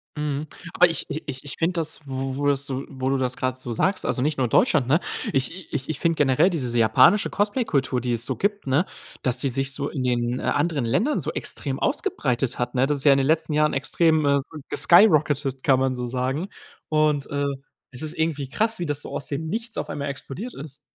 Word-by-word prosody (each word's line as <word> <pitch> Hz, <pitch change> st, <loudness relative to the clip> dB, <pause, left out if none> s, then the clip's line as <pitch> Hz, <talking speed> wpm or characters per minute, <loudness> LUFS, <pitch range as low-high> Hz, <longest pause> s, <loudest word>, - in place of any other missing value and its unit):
Mhm. 150 Hz, 0 st, -3 dB, 0.3 s
Aber 180 Hz, 0 st, +5 dB
ich 165 Hz, -, -3 dB
i 155 Hz, -, -4 dB
ich 130 Hz, -1 st, -6 dB
ich 145 Hz, -, -5 dB
finde 170 Hz, +2 st, +1 dB
das, 160 Hz, -3 st, -2 dB
wo 135 Hz, 0 st, -3 dB
wo 145 Hz, -, -2 dB
du 140 Hz, -, +4 dB
so 135 Hz, 0 st, -4 dB
wo 130 Hz, -1 st, -3 dB
du 135 Hz, -, +1 dB
das 125 Hz, -1 st, -1 dB
grad 130 Hz, -1 st, -1 dB
so 120 Hz, -2 st, -7 dB
sagst 185 Hz, -, 0 dB
also 125 Hz, -, 0 dB
nicht 150 Hz, +1 st, 0 dB
nur 130 Hz, -2 st, +1 dB
Deutschland, 130 Hz, +2 st, +3 dB
ne? 150 Hz, +5 st, +4 dB, 0.3 s
Ich 150 Hz, +7 st, -3 dB
ich 145 Hz, 0 st, -3 dB
ich 155 Hz, -, -2 dB
finde 165 Hz, -1 st, +1 dB
generell 145 Hz, +4 st, +3 dB
diese 130 Hz, -9 st, -2 dB
japanische 130 Hz, -, +5 dB
Cosplay-Kultur, 195 Hz, -, 0 dB
die 125 Hz, 0 st, -1 dB
es 115 Hz, 0 st, -1 dB
so -, -, -1 dB
gibt, 205 Hz, +1 st, -1 dB
ne, 140 Hz, +7 st, +2 dB, 0.4 s
dass 125 Hz, -2 st, +2 dB
die 140 Hz, -, +1 dB
sich 135 Hz, +2 st, -1 dB
so 140 Hz, +1 st, -2 dB
in 130 Hz, -3 st, -3 dB
den, 120 Hz, 0 st, 0 dB
äh, -, -, -7 dB
anderen 145 Hz, -4 st, 0 dB
Ländern 240 Hz, -, +1 dB
so -, -, -2 dB
extrem -, -, -4 dB
ausgebreitet 130 Hz, -, -1 dB
hat, 125 Hz, 0 st, -2 dB
ne? 130 Hz, +2 st, +3 dB
Das 145 Hz, -1 st, 0 dB
ist -, -, -6 dB
ja 145 Hz, -, +7 dB
in 135 Hz, -, +5 dB
den 135 Hz, -, +1 dB
letzten 160 Hz, -1 st, +2 dB
Jahren 150 Hz, 0 st, +2 dB
extrem, 155 Hz, +3 st, +2 dB
äh, 140 Hz, 0 st, +3 dB
so 155 Hz, -, -10 dB
geskyrocketet, 150 Hz, -8 st, +4 dB
kann 135 Hz, -2 st, +4 dB
man 130 Hz, 0 st, +1 dB
so 125 Hz, -1 st, -4 dB
sagen. 130 Hz, +7 st, -2 dB, 0.4 s
Und, 155 Hz, -2 st, +2 dB
äh, 140 Hz, 0 st, -1 dB, 0.5 s
es 125 Hz, -, -5 dB
ist 155 Hz, -1 st, -4 dB
irgendwie 155 Hz, -4 st, -1 dB
krass, 220 Hz, +9 st, 0 dB
wie 175 Hz, -, -2 dB
das 145 Hz, -2 st, -2 dB
so -, -, -8 dB
aus -, -, -5 dB
dem 150 Hz, +3 st, -3 dB
Nichts 225 Hz, +6 st, -4 dB
auf -, -, -3 dB
einmal 140 Hz, 0 st, -3 dB
explodiert 155 Hz, -, -6 dB
ist. 140 Hz, 0 st, -8 dB
140 Hz, 230 wpm, -24 LUFS, 130-160 Hz, 0.5 s, ja